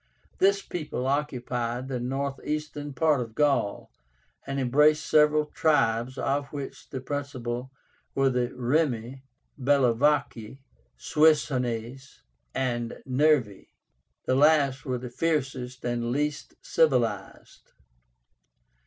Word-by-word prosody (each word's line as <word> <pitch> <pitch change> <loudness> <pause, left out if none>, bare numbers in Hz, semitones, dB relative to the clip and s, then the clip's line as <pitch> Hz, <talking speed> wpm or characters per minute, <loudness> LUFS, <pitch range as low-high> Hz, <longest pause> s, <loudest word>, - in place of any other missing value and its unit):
This 195 0 +3
people 150 -6 -4
occupied 125 -3 -2
the 130 -2 -3
northeastern 140 +3 -3
part 145 0 +2
of 115 -2 -7
Gaul, 140 -9 0 0.6
and 135 0 -2
embraced 150 +4 +3
several 150 0 +4
tribes, 130 -5 +1
of 140 +1 -1
which 140 -2 -7
the 130 - -5
principal 130 -3 -4 0.5
were 135 -1 +3
the 125 -1 0
REMI, 130 -1 -1 0.4
BELLOVACI, 135 -2 +1 0.4
SUESSIÓNES, 135 -4 0 0.3
and 120 -3 -2
NERVII. 130 -6 +1 0.6
The - - +1
last 140 -2 +3
were 130 -2 -1
the 125 0 -8
fiercest 130 -4 -2
and 120 -1 -1
least 150 +2 -2
civilized. 120 -10 -1
135 Hz, 100 wpm, -27 LUFS, 125-150 Hz, 0.6 s, several